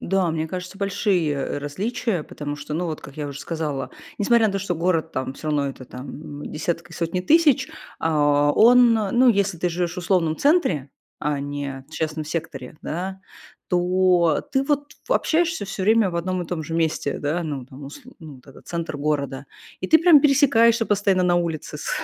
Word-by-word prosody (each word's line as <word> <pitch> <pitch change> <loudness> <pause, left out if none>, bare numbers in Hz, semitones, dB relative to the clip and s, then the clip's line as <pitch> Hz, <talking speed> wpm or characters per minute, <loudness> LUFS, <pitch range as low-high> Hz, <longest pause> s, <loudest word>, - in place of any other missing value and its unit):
Да, 190 -2 +1
мне 160 0 -2
кажется, 180 +3 -7
большие, 195 -5 +1
э, 145 0 -3
различия, 185 - -2
потому 145 -1 -6
что, 145 +1 -8
ну, 175 +2 -1
вот 155 -2 -4
как 140 - -12
я 150 -1 -4
уже 140 0 -7
сказала, 155 -5 -3 0.3
несмотря 230 +2 +4
на 205 - -1
то, 195 - -1
что 185 -2 -2
город 165 -1 0
там, 130 0 -3
всё 155 - -6
равно 145 -2 +1
это 135 -1 -9
там 145 +4 -9
десятки 170 +2 -3
и - - -10
сотни 170 +2 -2
тысяч, 300 - +4 0.3
а, 145 -2 +2
он, 240 +3 +6
ну, 225 +4 +3
если 200 -5 +2
ты 180 - 0
живешь 175 0 -2
в - - -6
условном 170 -3 +1
центре, 235 - +2 0.3
а 150 -1 -1
не 140 -1 -5
в - - -25
частном 155 -1 -3
секторе, 155 -3 -6
да, 190 +4 -5 0.5
то 180 -2 +2
ты, 265 - +2
вот, 290 +1 -1 0.2
в, - - -13
общаешься 330 - +1
всё 195 -1 -5
время 215 0 +4
в 170 - -4
одном 185 +1 -2
и - - -8
том 165 -1 -3
же 165 +1 -6
месте. 160 -3 -1
Да. 155 +4 -1
Ну 145 -6 -5
там 135 +2 -11
усл 245 - -11
ну 155 -4 -10
вот 125 - -21
этот 135 - -16
центр 165 -3 -4
города, 140 -2 -2 0.4
и 185 - -4
ты 320 - +7
прям 330 -3 +7
пересекаешься 245 -6 +4
постоянно 195 -3 +2
на 175 -1 +3
улице 165 -3 -2
с - - -5
170 Hz, 200 wpm, -23 LUFS, 150-200 Hz, 0.5 s, ты